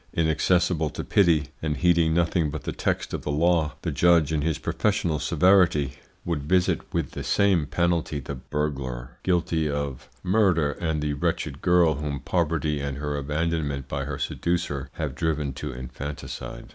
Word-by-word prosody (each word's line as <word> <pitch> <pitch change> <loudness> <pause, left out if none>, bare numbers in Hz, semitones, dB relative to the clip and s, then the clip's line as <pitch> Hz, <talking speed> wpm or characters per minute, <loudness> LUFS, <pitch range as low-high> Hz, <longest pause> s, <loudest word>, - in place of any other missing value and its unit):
Inaccessible 80 0 +2
to 75 - -5
pity, 80 -7 +3
and 75 -2 -1
heeding 85 0 +3
nothing 85 -2 +2
but 75 -2 -6
the - - -3
text - - -2
of - - -2
the - - -5
law, 80 +1 +2
the 85 - -1
judge 80 0 +4
in 75 - +1
his 80 0 0
professional 85 0 0
severity 80 -3 +3 0.3
would 85 -4 -1
visit 90 -1 +1
with - - -1
the - - -6
same 95 -7 +2
penalty 85 -3 0
the 70 +1 -6
burglar 65 -3 -4
guilty 85 -3 +1
of 70 -3 -4
murder 90 -6 +3
and 80 0 -2
the 75 -1 0
wretched 70 0 -2
girl 85 -4 +4
whom 75 -2 -3
poverty 75 -3 0
and 70 -1 -3
her 75 0 -3
abandonment 75 -1 -2
by - - -3
her - - -4
seducer 80 -6 -2
have - - -3
driven 75 -4 -1
to - - -5
infanticide. 65 +3 -7
75 Hz, 160 wpm, -25 LUFS, 70-85 Hz, 0.3 s, judge